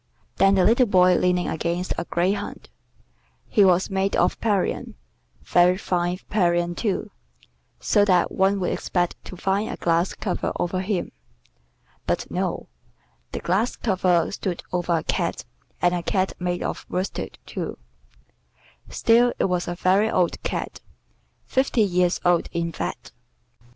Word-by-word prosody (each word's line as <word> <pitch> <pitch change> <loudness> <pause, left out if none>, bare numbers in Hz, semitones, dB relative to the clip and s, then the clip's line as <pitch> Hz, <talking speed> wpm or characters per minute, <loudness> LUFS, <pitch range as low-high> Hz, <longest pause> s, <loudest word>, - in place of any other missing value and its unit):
Then 195 0 +5
the 190 - +4
little 235 +5 +4
boy 185 -2 +5
leaning 180 -1 +1
against 170 +3 -2
a - - -3
greyhound; 190 +5 -2 0.8
he 210 - +4
was 185 +1 +3
made 195 +1 0
of - - +1
Parian, 205 -4 -1 0.5
very 175 - +4
fine 180 -2 -1
Parian, 175 -3 +1
too, 200 +2 -2 0.7
so 135 - +3
that 180 -3 +3
one 195 +1 +2
would 180 - -1
expect 175 -1 -2
to 185 - -9
find 195 +4 0
a - - -5
glass 170 +2 +1
cover 195 -4 -2
over 185 +1 -1
him: 190 -1 -2 1.0
but - - -1
no, - - -2 0.6
the - - -5
glass 200 +8 0
cover 185 -5 +1
stood 185 -3 -4
over 175 -1 +1
a - - -3
cat - - -2 0.4
and 175 0 +4
a 175 - -1
cat 185 +2 0
made 175 0 -2
of - - -4
worsted, 185 +1 -3
too: - - -5 1.1
still 240 +2 +3
it - - +1
was 180 -2 -1
a 175 - -3
very 190 +5 +2
old 180 -5 0
cat, - - -4 0.6
fifty 260 -3 +1
years 180 -3 +2
old 175 -1 +3
in 170 -1 -1
fact. - - -5
180 Hz, 145 wpm, -24 LUFS, 175-195 Hz, 1.1 s, Then